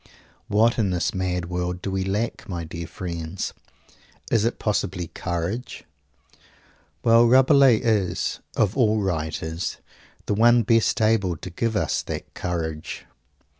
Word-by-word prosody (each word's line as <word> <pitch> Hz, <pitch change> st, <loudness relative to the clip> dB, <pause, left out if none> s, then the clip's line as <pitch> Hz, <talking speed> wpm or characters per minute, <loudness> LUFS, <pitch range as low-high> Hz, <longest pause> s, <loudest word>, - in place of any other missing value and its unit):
What 115 Hz, +3 st, +3 dB
in 105 Hz, -3 st, +2 dB
this 90 Hz, -2 st, 0 dB
mad 90 Hz, -2 st, -2 dB
world, 90 Hz, 0 st, -3 dB
do 95 Hz, -, -2 dB
we 95 Hz, 0 st, -1 dB
lack, 105 Hz, +4 st, -3 dB
my 85 Hz, -3 st, -3 dB
dear 85 Hz, +1 st, -6 dB
friends? 85 Hz, 0 st, -5 dB, 0.8 s
Is 115 Hz, -3 st, +3 dB
it 115 Hz, -, 0 dB
possibly 95 Hz, -4 st, -2 dB
courage? 90 Hz, +7 st, -4 dB, 1.2 s
Well, 115 Hz, +1 st, +6 dB
Rabelais 130 Hz, 0 st, +6 dB
is, 100 Hz, -6 st, 0 dB, 0.2 s
of 105 Hz, -2 st, +1 dB
all 110 Hz, -5 st, +3 dB
writers, 80 Hz, -2 st, -3 dB, 0.5 s
the -, -, 0 dB
one 120 Hz, +3 st, +5 dB
best 115 Hz, +2 st, +2 dB
able 100 Hz, -6 st, +2 dB
to 95 Hz, -, -8 dB
give 110 Hz, +6 st, -1 dB
us -, -, 0 dB
that -, -, -6 dB
courage. 80 Hz, -3 st, -4 dB
95 Hz, 130 wpm, -24 LUFS, 85-115 Hz, 1.2 s, Well